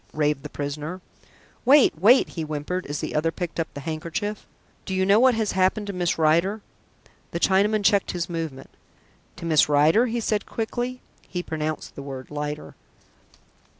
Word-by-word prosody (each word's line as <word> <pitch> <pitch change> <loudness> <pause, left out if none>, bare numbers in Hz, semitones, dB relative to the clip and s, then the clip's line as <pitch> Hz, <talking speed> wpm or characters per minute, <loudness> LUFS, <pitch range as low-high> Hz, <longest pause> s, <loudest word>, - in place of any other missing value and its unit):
raved 150 -2 +1
the 150 - -8
prisoner. 150 +5 -5 0.6
"Wait, 275 +2 +6
wait!" 235 +9 +6
he 165 - -5
whimpered 155 +4 -3
as 145 +1 -4
the - - -4
other 160 +2 +1
picked 175 0 -5
up 165 - -2
the 140 - -6
handkerchief. 170 +7 -4 0.4
"Do 190 - -4
you 190 0 +2
know 200 +3 +5
what 255 -1 +5
has 220 -2 0
happened 190 +3 +1
to 200 - -5
Miss 175 -2 0
Rider?" 170 +7 +2 0.7
The 170 - -4
Chinaman 205 +3 +2
checked 200 +1 +3
his 175 -1 -2
movement. 160 -6 -5 0.6
"To 175 - -8
Miss 155 -2 +4
Rider?" 155 +11 +4
he 235 0 -2
said 215 -2 -1
quickly. 245 +3 -3 0.3
(He 180 -1 -4
pronounced 155 -1 -4
the - - -8
word 135 -1 -8
"Lider.") 150 0 -5
170 Hz, 170 wpm, -24 LUFS, 150-205 Hz, 0.7 s, Wait